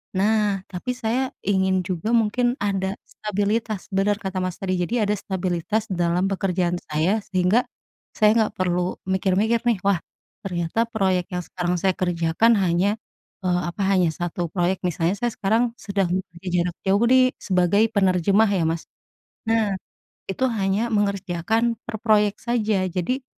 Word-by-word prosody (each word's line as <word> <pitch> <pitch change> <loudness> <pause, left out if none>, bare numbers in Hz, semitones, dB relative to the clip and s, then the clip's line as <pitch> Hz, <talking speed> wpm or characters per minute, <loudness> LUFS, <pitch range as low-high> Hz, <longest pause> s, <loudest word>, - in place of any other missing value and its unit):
Nah, 205 0 +2
tapi 185 +7 -3
saya 250 +2 -1 0.2
ingin 190 -1 +2
juga 185 +5 -3
mungkin 240 +3 +2
ada 195 -1 -1
stabilitas. 210 0 -2
Bener 195 +2 +2
kata 190 -3 -4
Mas, 185 -2 -2
tadi. 185 -2 -1
Jadi, 220 +6 0
ada 205 - +1
stabilitas 190 +2 -2
dalam 175 0 +1
pekerjaan 180 -2 0
saya, 160 +8 +1
sehingga 185 +6 +2 0.5
saya 215 -1 +5
enggak 220 -2 +2
perlu 180 -1 0
mikir-mikir 190 +4 +1
nih, 235 - +4
"Wah, 195 -3 +2 0.4
ternyata 180 +5 -1
proyek 190 -5 0
yang 180 - -2
sekarang 175 +1 -2
saya 190 +2 +2
kerjakan 175 +5 +2
hanya, 190 +1 +2 0.5
eee, 180 -1 +1
apa, 175 +4 -5
hanya 185 -3 +3
1 175 0 -3
proyek." 180 +2 0
Misalnya 175 +3 -1
saya 240 -1 0
sekarang 230 +4 +1
sedang 200 -5 -1
bekerja 185 -1 -6 0.2
jarak 175 -1 -3
jauh 200 +4 +3
nih, 255 0 +5
sebagai 185 +2 +2
penerjemah 195 +1 +3
ya, 175 - +1
Mas. 165 +1 -2 0.6
Nah, 225 -2 +2 0.6
itu 195 +7 -1
hanya 210 +2 0
mengerjakan 205 +3 0
per 235 - -6
proyek 210 -2 +3
saja. 220 -5 +1
Jadi, 250 +9 -2
195 Hz, 145 wpm, -23 LUFS, 180-220 Hz, 0.6 s, saya